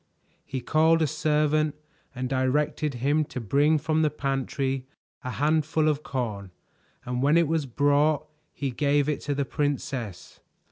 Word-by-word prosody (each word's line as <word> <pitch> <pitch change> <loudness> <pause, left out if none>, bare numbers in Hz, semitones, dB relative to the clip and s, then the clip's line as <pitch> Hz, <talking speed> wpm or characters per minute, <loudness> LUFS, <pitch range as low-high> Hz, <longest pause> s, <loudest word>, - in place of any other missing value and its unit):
He 130 -1 -5
called 160 +5 +3
a - - +4
servant 155 0 +1 0.4
and 130 0 -2
directed 140 +2 0
him 145 +6 +1
to 130 - -6
bring 145 +7 +3
from 155 +2 0
the 155 - +3
pantry 135 -2 -2 0.4
a 125 - -4
handful 155 +3 +1
of 150 -1 +1
corn, 110 -9 -4 0.6
and 125 0 -2
when 145 +4 +4
it 170 -2 +3
was 160 -2 0
brought 145 +3 +2 0.3
he 140 -2 -3
gave 145 +2 +1
it 150 - -1
to 145 0 -2
the 140 0 0
princess. 135 - -3
145 Hz, 150 wpm, -26 LUFS, 130-155 Hz, 0.6 s, a